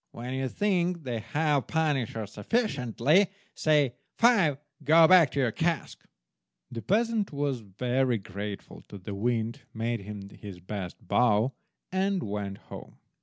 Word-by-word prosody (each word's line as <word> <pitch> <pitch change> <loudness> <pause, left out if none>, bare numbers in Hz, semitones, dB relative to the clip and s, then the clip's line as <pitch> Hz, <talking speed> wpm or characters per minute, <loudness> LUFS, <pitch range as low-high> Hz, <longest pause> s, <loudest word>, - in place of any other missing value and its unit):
When 125 +2 -6
you 130 0 -1
think 180 -3 0
they 120 -4 -3
have 145 +5 0
punished 150 -8 0
her 110 -1 -4
sufficiently, 150 - +1 0.3
say, 150 -5 +2 0.2
'Five, 200 - +4 0.3
go 160 +1 +7
back 175 -5 +7
to 140 - -3
your 125 -4 +2
cask!'" 165 +5 -2 0.7
The 115 -2 -5
peasant 220 - +1
was 140 -3 -1
very 120 +4 0
grateful 100 +1 -7
to 100 - -9
the 100 +2 -7
Wind, 115 +4 -1
made 115 +1 -1
him 100 0 -8
his 100 -4 -10
best 95 0 -7
bow, 120 +3 +3 0.4
and 190 0 0
went 100 -1 -4
home. - - -11
125 Hz, 140 wpm, -28 LUFS, 105-160 Hz, 0.7 s, go